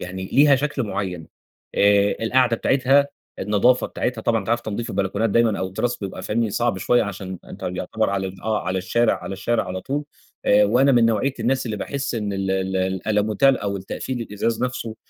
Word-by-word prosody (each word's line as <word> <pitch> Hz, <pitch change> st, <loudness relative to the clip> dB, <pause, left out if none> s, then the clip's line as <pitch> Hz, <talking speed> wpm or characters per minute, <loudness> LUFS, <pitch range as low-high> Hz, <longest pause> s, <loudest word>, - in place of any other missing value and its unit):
يعني 95 Hz, +1 st, -6 dB
ليها 140 Hz, 0 st, +6 dB
شكل 145 Hz, -1 st, -2 dB
معيّن، 95 Hz, -6 st, -4 dB, 0.5 s
آآ، 100 Hz, 0 st, +4 dB
القعدة 125 Hz, 0 st, +3 dB
بتاعتها، 135 Hz, +3 st, +3 dB, 0.3 s
النضافة 105 Hz, +5 st, +2 dB
بتاعتها، 120 Hz, -3 st, -3 dB
طبعًا 115 Hz, 0 st, +2 dB
أنت 100 Hz, -, -9 dB
عارف 120 Hz, 0 st, +2 dB
تنضيف 115 Hz, +2 st, -4 dB
البلكونات 100 Hz, +3 st, 0 dB
دايمًا 115 Hz, -1 st, +2 dB
أو 95 Hz, -, -1 dB
التراس 120 Hz, +6 st, -2 dB
بيبقى 100 Hz, -2 st, -6 dB
فني 115 Hz, 0 st, 0 dB
صعب 120 Hz, -1 st, 0 dB
شويّة، 120 Hz, +5 st, +3 dB
عشان 95 Hz, -2 st, -6 dB
أنت -, -, -11 dB
يُعتبر 105 Hz, +4 st, -1 dB
على 95 Hz, -1 st, -1 dB
ال 95 Hz, 0 st, -9 dB
آه، 110 Hz, 0 st, -1 dB
على 95 Hz, +1 st, 0 dB
الشارع 115 Hz, +5 st, +2 dB
على -, -, -5 dB
الشارع 110 Hz, +4 st, 0 dB
على 95 Hz, 0 st, -5 dB
طول، 145 Hz, +6 st, -3 dB, 0.4 s
آآ، 105 Hz, +1 st, +5 dB
وأنا 125 Hz, +6 st, +4 dB
من 120 Hz, -2 st, +5 dB
نوعية 115 Hz, +5 st, +1 dB
الناس 130 Hz, +3 st, 0 dB
اللي 110 Hz, -2 st, -3 dB
باحس 140 Hz, +5 st, -3 dB
إن 105 Hz, -3 st, -2 dB
ال 95 Hz, -1 st, -2 dB
ال 95 Hz, 0 st, -1 dB
الألوميتال 105 Hz, +7 st, +1 dB
أو 100 Hz, -1 st, -2 dB
التقفيل 120 Hz, +6 st, -5 dB
الإزاز 115 Hz, +1 st, -2 dB
نفسه 115 Hz, -3 st, -3 dB
110 Hz, 190 wpm, -22 LUFS, 95-120 Hz, 0.5 s, ليها